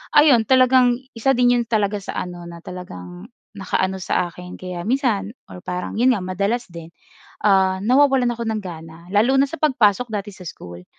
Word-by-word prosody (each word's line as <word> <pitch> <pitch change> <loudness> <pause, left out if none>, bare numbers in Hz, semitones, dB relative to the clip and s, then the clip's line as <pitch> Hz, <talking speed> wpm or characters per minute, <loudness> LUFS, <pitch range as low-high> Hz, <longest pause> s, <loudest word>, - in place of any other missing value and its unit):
ayun 265 -7 +6
talagang 255 -1 +5 0.2
isa 255 +3 +1
din 245 0 +4
iyon 235 - -3
talaga 210 -2 0
sa 195 - -7
ano 175 -1 -9
na 170 - -9
talagang 180 - -9 0.3
naka-ano 190 0 -1
sa 180 -1 -1
akin. 180 +1 -11
Kaya 180 -1 -7
minsan, 225 -5 0 0.2
or 180 - -10
parang 180 0 -4
'yon 255 +2 +4
nga 210 - -2
madalas 200 +6 -1
din, 170 -1 -10 0.6
ah, 190 -1 +3
nawawalan 260 +2 +3
ako 235 - -4
ng 220 -1 -2
gana 165 -2 -10
lalo 225 +8 +3
na 275 - +2
sa 330 - -6
pagpasok 240 -6 +2
dati 205 -1 -5
sa 180 - -12
school. 90 - -10
205 Hz, 180 wpm, -21 LUFS, 180-245 Hz, 0.6 s, ayun